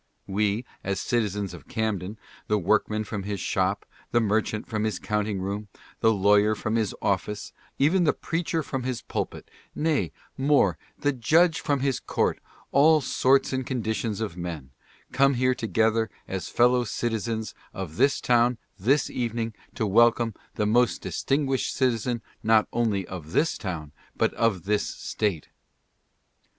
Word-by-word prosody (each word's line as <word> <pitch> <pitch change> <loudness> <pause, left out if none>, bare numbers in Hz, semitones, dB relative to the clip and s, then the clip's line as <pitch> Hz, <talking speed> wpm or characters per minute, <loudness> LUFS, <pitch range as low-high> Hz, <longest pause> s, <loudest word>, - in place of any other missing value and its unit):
We, 105 +4 0 0.2
as 95 0 -1
citizens 105 -5 -1
of 80 -6 -11
Camden, 110 -2 -2 0.3
the 105 - +2
workman 110 +3 +1
from 105 -1 -4
his 100 0 -4
shop, - - 0 0.2
the 120 - +3
merchant 110 0 0
from 110 -1 -2
his 110 -4 -1
counting 105 -1 -1
room, 100 +3 -3 0.3
the 110 - +4
lawyer 105 +1 +4
from 110 +1 -2
his 110 -3 0
office, 100 +1 -1 0.2
even 170 +7 +3
the 155 - +4
preacher 165 -1 -2
from 130 -2 -3
his 125 -2 -3
pul - - -2
pit - - -13 0.2
— - - -41
nay, 155 -2 +1 0.2
more, 140 +2 +3 0.2
the 145 - +1
judge 160 +7 +3
from 140 -2 0
his 135 -2 +1
court - - 0 0.2
— - - -28
all 155 +3 +6
sorts 135 0 +2
and 130 0 0
condi 115 -4 -1
tions 110 -1 -3
of 105 -6 -3
men 85 -7 -6 0.2
— - - -31
come 135 0 +4
here 130 +1 +3
together 115 -1 +1 0.2
as 95 -1 -4
fellow 125 +1 +4
citizens 115 -1 -2 0.2
of 90 -4 -6
this 140 0 +3
town 120 0 +3 0.2
this 135 +9 +3
evening 115 -2 -2 0.2
to 110 - 0
welcome 115 +2 +4 0.2
the 105 - 0
most 120 +4 +2
distinguished 135 -1 0
citizen 120 -2 0 0.2
not 110 0 +4
only 110 -5 +1
of 85 -3 -8
this 160 - +2
town, 80 -7 -5 0.3
but - - +2
of 105 -7 +1
this 105 +2 +1
State. 100 -8 -2
110 Hz, 160 wpm, -26 LUFS, 100-125 Hz, 0.3 s, all